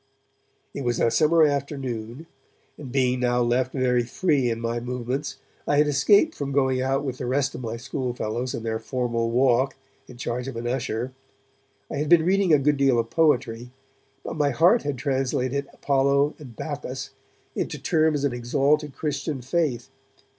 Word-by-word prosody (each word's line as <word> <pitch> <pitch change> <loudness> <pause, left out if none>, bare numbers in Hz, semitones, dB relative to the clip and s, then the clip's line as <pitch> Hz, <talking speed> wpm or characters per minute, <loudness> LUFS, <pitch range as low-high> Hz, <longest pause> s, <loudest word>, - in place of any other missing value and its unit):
It 140 - -5
was 120 -2 0
a 115 - +3
summer 160 +3 +4
afternoon, 135 -3 -2 0.5
and, 135 -4 -9
being 130 -1 +1
now 125 0 +1
left 125 +2 +1
very 125 -2 +1
free 135 +1 +1
in 115 -1 -2
my 115 0 -2
movements, 125 +3 -4 0.3
I 145 - +2
had 150 - +5
escaped 200 - +4
from 140 -1 -4
going 130 -2 +1
out 135 +2 0
with 130 -3 -4
the 125 - -3
rest 135 +1 0
of - - -7
my 115 -1 -4
schoolfellows 125 -1 -3
in 115 - -6
their 110 -1 -2
formal 120 -3 -1
walk 130 +2 +2 0.3
in 125 - -12
charge 120 +1 -3
of 135 - -6
an 115 +1 -5
usher. 125 0 -2 0.8
I - - -3
had 150 +1 -1
been 170 -2 +6
reading 190 -1 +2
a 150 - +7
good 145 +1 +2
deal 135 -3 +3
of 115 0 -1
poetry, 125 -7 +1 0.5
but - - -5
my 145 -2 +2
heart 170 - +4
had 145 -2 -3
translated 135 0 -1
Apollo 140 +1 +2
and 130 -6 -11
Bacchus - - -5 0.4
into - - -3
terms 155 -2 +1
of 140 -3 +1
exalted 140 +4 0
Christian 145 -1 -3
faith. 130 -3 -1
130 Hz, 170 wpm, -24 LUFS, 120-145 Hz, 0.8 s, a